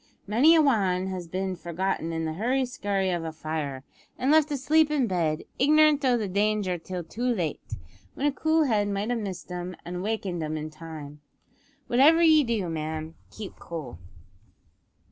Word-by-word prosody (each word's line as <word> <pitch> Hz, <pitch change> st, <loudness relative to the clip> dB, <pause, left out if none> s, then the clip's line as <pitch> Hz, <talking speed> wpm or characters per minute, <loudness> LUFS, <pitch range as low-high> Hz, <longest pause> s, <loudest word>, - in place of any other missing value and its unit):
Many 255 Hz, +11 st, +5 dB
a 320 Hz, -, +5 dB
wan 195 Hz, -9 st, +2 dB
has 180 Hz, -2 st, -5 dB
bin 185 Hz, +2 st, -3 dB
forgotten 170 Hz, -1 st, -2 dB
in 165 Hz, 0 st, -2 dB
the 160 Hz, -, -2 dB
hurry 250 Hz, +9 st, 0 dB
skurry 200 Hz, -6 st, -1 dB
of 170 Hz, -, -4 dB
a 160 Hz, -, -4 dB
fire, 155 Hz, -4 st, -4 dB, 0.3 s
and 265 Hz, +3 st, +1 dB
left 310 Hz, -1 st, +5 dB
asleep 295 Hz, +2 st, +3 dB
in 295 Hz, -4 st, +1 dB
bed, 165 Hz, -6 st, -1 dB, 0.2 s
ignorant 300 Hz, +1 st, +5 dB
o' 250 Hz, -2 st, +3 dB
the 215 Hz, -3 st, -2 dB
danger 200 Hz, -2 st, 0 dB
till 180 Hz, +1 st, -5 dB
too 190 Hz, +8 st, -9 dB
late; 210 Hz, -, -1 dB, 0.5 s
when 280 Hz, -, -2 dB
a 290 Hz, -, +3 dB
cool 315 Hz, +3 st, +2 dB
head 215 Hz, -7 st, +1 dB
might 205 Hz, +3 st, -2 dB
have 240 Hz, -, 0 dB
missed 190 Hz, -4 st, -6 dB
'em, 180 Hz, 0 st, -5 dB
and 180 Hz, +1 st, -5 dB
wakened 195 Hz, -4 st, -2 dB
'em 155 Hz, 0 st, -3 dB
in 155 Hz, 0 st, -5 dB
time. 155 Hz, -2 st, -9 dB, 0.6 s
Whatever 300 Hz, +7 st, +5 dB
ye 315 Hz, -2 st, +6 dB
do, 225 Hz, -7 st, -1 dB
ma'am 160 Hz, 0 st, -4 dB, 0.2 s
keep 210 Hz, -3 st, -9 dB
cool." 150 Hz, -, -7 dB
195 Hz, 175 wpm, -26 LUFS, 165-255 Hz, 0.6 s, ye